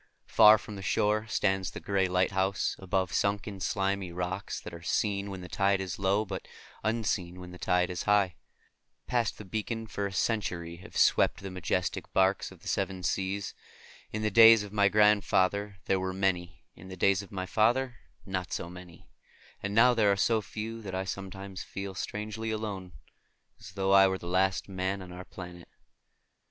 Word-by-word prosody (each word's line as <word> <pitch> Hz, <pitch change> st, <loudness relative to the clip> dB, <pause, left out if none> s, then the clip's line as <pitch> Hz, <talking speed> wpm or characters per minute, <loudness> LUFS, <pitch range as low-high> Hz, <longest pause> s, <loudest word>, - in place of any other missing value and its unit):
Far 105 Hz, +1 st, +7 dB
from 105 Hz, 0 st, -9 dB
the -, -, -7 dB
shore 105 Hz, +3 st, +1 dB
stands 95 Hz, -4 st, 0 dB
the -, -, -8 dB
gray 95 Hz, -2 st, +1 dB
lighthouse, 95 Hz, +1 st, +1 dB
above 95 Hz, -1 st, -1 dB
sunken 100 Hz, 0 st, -1 dB
slimy 95 Hz, -1 st, -1 dB
rocks 90 Hz, +3 st, -4 dB
that 90 Hz, -, -9 dB
are 85 Hz, -, -9 dB
seen 100 Hz, +3 st, -1 dB
when 95 Hz, -2 st, -6 dB
the 90 Hz, -, -8 dB
tide 100 Hz, +2 st, +1 dB
is 95 Hz, -1 st, -4 dB
low, 100 Hz, +2 st, +2 dB
but 95 Hz, -1 st, -6 dB, 0.4 s
unseen 100 Hz, -5 st, -1 dB
when 90 Hz, -1 st, -9 dB
the 90 Hz, -, -11 dB
tide 90 Hz, 0 st, +1 dB
is 90 Hz, -, -3 dB
high. 100 Hz, -3 st, +4 dB, 0.7 s
Past 120 Hz, -3 st, 0 dB
that 100 Hz, -4 st, -11 dB
beacon 110 Hz, +1 st, -3 dB
for 100 Hz, -2 st, -3 dB
a -, -, -8 dB
century 90 Hz, -5 st, -2 dB
have 90 Hz, -, -10 dB
swept -, -, +3 dB
the 95 Hz, -, -5 dB
majestic 95 Hz, -3 st, -2 dB
barques 95 Hz, 0 st, +2 dB
of -, -, -15 dB
the -, -, -10 dB
seven 95 Hz, -1 st, -2 dB
seas. 95 Hz, +2 st, -2 dB, 0.6 s
In 110 Hz, 0 st, -3 dB
the 105 Hz, -, +1 dB
days 115 Hz, 0 st, +8 dB
of 105 Hz, 0 st, -10 dB
my 100 Hz, -2 st, +4 dB
grandfather 100 Hz, -1 st, +3 dB
there 95 Hz, -, +1 dB
were 95 Hz, 0 st, -2 dB
many; 90 Hz, -2 st, -1 dB
in 95 Hz, -, -13 dB
the 95 Hz, 0 st, -9 dB
days 100 Hz, +2 st, +3 dB
of 100 Hz, -, -13 dB
my 95 Hz, -2 st, -3 dB
father 120 Hz, +5 st, +1 dB, 0.3 s
not 95 Hz, -2 st, -3 dB
so 85 Hz, -, -4 dB
many; 90 Hz, -1 st, -13 dB, 0.5 s
and 100 Hz, +1 st, -3 dB
now 125 Hz, +3 st, +6 dB
there 110 Hz, -4 st, +3 dB
are 100 Hz, -, +1 dB
so 110 Hz, +2 st, +2 dB
few 110 Hz, +2 st, -6 dB
that 95 Hz, -3 st, -6 dB
I 95 Hz, -, -1 dB
sometimes 95 Hz, 0 st, -6 dB
feel 100 Hz, 0 st, -6 dB
strangely 105 Hz, +3 st, -4 dB
alone, 100 Hz, -5 st, -4 dB, 0.7 s
as 100 Hz, -, -12 dB
though 95 Hz, 0 st, 0 dB
I 95 Hz, 0 st, +7 dB
were 95 Hz, 0 st, -1 dB
the 85 Hz, -, -9 dB
last 95 Hz, +1 st, +1 dB
man 95 Hz, 0 st, -2 dB
on 90 Hz, -, -11 dB
our 90 Hz, +1 st, -8 dB
planet. 90 Hz, -2 st, -10 dB
95 Hz, 185 wpm, -29 LUFS, 95-105 Hz, 0.7 s, days